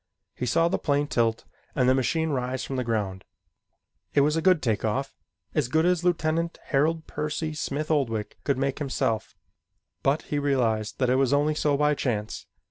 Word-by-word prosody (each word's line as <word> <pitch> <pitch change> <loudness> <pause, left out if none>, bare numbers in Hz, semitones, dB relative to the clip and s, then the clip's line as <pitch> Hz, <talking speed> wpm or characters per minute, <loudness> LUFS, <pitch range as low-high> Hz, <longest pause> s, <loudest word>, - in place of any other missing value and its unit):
He 125 - -4
saw 165 +7 +3
the 170 - 0
plane 145 -1 +1
tilt 115 -5 0 0.3
and 125 -3 +2
the 130 - +6
machine 160 +5 +1
rise 130 -1 -2
from 135 - -4
the 130 - 0
ground. 105 -5 -2 0.9
It 140 - +6
was 150 +2 +2
a 165 - +1
good 185 -2 +4
take 110 -4 0
off 135 +5 -1 0.4
as 150 -5 +1
good 160 +5 +2
as 180 -1 +2
Lieutenant 165 -1 0
Harold 160 +3 +1
Percy 155 +1 -3
Smith 150 +1 -3
Oldwick 115 -8 -1
could 140 -3 +1
make 135 0 -1
himself 130 -6 -1 0.7
but 140 +3 +1
he 145 - -2
realized 120 -7 0
that 130 -2 +2
it 130 - +3
was 135 0 +2
only 145 +2 +3
so 150 -1 +1
by 150 +1 +3
chance. 110 -7 -3
140 Hz, 185 wpm, -26 LUFS, 125-155 Hz, 0.9 s, the